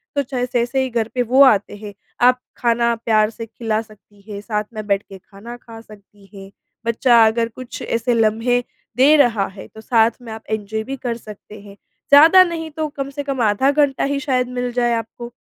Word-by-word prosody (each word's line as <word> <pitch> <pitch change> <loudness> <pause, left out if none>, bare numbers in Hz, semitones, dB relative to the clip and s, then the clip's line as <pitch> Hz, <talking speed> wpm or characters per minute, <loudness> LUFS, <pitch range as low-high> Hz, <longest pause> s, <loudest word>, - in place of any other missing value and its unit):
तो 285 - +2
चाहे 250 -2 -3
जैसे 245 +2 0
ही 260 - -3
घर 230 -2 -1
पे 250 - +1
वो 250 +3 +3
आते 210 -7 +3
हैं, 205 0 -10 0.3
आप 250 +1 +4 0.2
खाना 235 0 +1
प्यार 220 -2 +1
से 230 +1 -8
खिला 225 -1 -3
सकती 210 -2 -20
हैं, 200 - -6
साथ 210 -1 -3
में 215 -1 -6
बैठ 200 -1 0
के 195 - -10
खाना 200 +5 -12
खा 230 -2 -13
सकती 205 -2 -19
हैं। 195 -1 -11 0.4
बच्चा 230 0 +4
अगर 230 +1 0
कुछ 255 -1 -9
ऐसे 230 +1 -1
लम्हे 230 +2 +1 0.3
दे 280 +4 +6
रहा 230 -8 +2
है, 190 0 -12
तो 220 - -14
साथ 225 0 +2
में 235 -2 -10
आप 220 0 -10
एन्जॉय 220 0 -3
भी 270 +4 -6
कर 235 -2 -4
सकते 210 -1 -13
हैं। 200 -1 -14 0.3
ज़्यादा 320 +6 +8
नहीं 330 -2 -5
तो 310 +1 -3
कम 275 -2 -6
से 285 +1 -6
कम 275 -3 -3
आधा 220 +5 +2
घंटा 285 -2 +1
ही 280 0 -1
शायद 260 -3 -1
मिल 250 0 -3
जाए 240 -1 +1
आपको, 230 +1 -5
235 Hz, 210 wpm, -19 LUFS, 215-255 Hz, 0.4 s, ज़्यादा